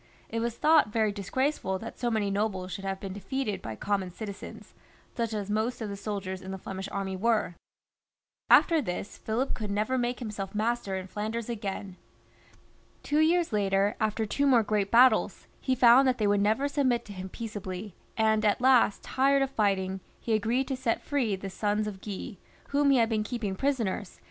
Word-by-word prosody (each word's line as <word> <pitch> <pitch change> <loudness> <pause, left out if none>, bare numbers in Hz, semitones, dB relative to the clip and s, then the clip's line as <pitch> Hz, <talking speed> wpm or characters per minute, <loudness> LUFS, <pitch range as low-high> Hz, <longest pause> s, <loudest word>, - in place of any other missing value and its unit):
It 230 - -2
was 235 0 -2
thought 305 -8 +4
very 220 -1 +2
disgraceful 205 0 -1
that 230 +4 -9
so 240 - 0
many 215 -3 0
nobles 195 -2 -1
should 195 - -6
have 195 0 -2
been 195 -1 -6
defeated 210 +2 -3
by 110 - -6
common 195 - -1
citizens, 200 +2 -9 0.4
such 230 -2 -1
as 205 -2 -3
most 220 +4 0
of 220 -3 -4
the 200 - -4
soldiers 195 -2 -4
in 190 - -9
the 190 - -4
Flemish 190 +1 -6
army 195 -1 -3
were. 220 -2 +1 1.0
After 330 -3 +6
this 200 -3 -5
Philip 240 +5 -1
could 215 -3 -4
never 215 +6 0
make 245 0 -1
himself 210 -4 -5
master 220 -2 -1
in 190 -1 -4
Flanders 215 +4 -4
again. 200 -4 -5 1.1
Two 295 - +1
years 330 -2 +3
later, 200 0 +2
after 220 0 0
two 280 +7 0
more 245 -4 +5
great 205 -2 0
battles, 250 +2 +4
he 260 - 0
found 250 +2 +7
that 255 -1 +2
they 215 - 0
would 205 0 +3
never 220 +7 +2
submit 260 -5 +1
to 205 - -9
him 190 0 -7
peaceably, 205 -3 -6 0.2
and 220 -1 +3
at 210 -1 +2
last, 250 -4 +4
tired 275 +1 +2
of 270 - -3
fighting, 190 -4 0 0.2
he 230 - -2
agreed 230 +5 +1
to 270 - 0
set 250 -3 -1
free 250 -8 0
the 195 +1 -7
sons 210 +2 0
of 200 -3 -6
Guy, 205 +1 -6 0.3
whom 285 0 +3
he 275 - +5
had 230 -2 +4
been 220 -2 +1
keeping 215 -4 -3
prisoners, - - -20
136 225 -9 -1
PHILIP - - -22
IV. - - -27
215 Hz, 195 wpm, -28 LUFS, 195-245 Hz, 1.1 s, found